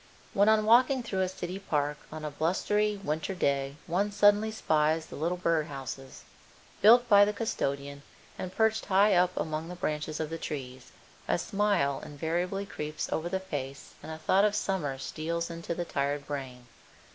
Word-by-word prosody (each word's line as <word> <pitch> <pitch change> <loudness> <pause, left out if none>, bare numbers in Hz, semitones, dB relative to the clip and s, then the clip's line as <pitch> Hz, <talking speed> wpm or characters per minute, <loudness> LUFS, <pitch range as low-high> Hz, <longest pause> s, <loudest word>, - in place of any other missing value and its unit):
When 200 +2 +4
on 215 -1 +4
walking 250 +3 +5
through 195 -5 -2
a 185 - +1
city 185 +1 -5
park 150 -5 -1
on 155 0 -6
a 150 - -3
blustery 205 +7 0
winter 160 +5 -2
day 140 -4 0
one 195 +5 0
suddenly 205 +1 +4
spies 160 -6 +1
the - - -10
little 170 +4 -1
bird 165 -3 +1
houses, 135 -1 -8 0.6
built 240 +4 +7
by 205 -3 +7
the 210 +1 +1
custodian 140 -10 -3 0.3
and 185 - -5
perched 220 +2 +1
high 200 +1 +5
up 180 0 +4
among 155 +1 -3
the 180 - -6
branches 155 -3 -3
of 160 0 -3
the 165 - -4
trees, 130 -4 -6 0.4
a - - +2
smile 200 -9 0
invariably 175 +6 -2
creeps 150 -5 -5
over 165 +2 -1
the 190 +1 -1
face 140 -7 -6
and - - -8
a 160 - -6
thought 185 +5 +3
of 210 0 +2
summer 180 -10 -1
steals 170 +4 -3
into 170 0 -4
the 175 - -3
tired 140 -1 -2
brain. 130 -4 -6
170 Hz, 175 wpm, -29 LUFS, 145-200 Hz, 0.6 s, built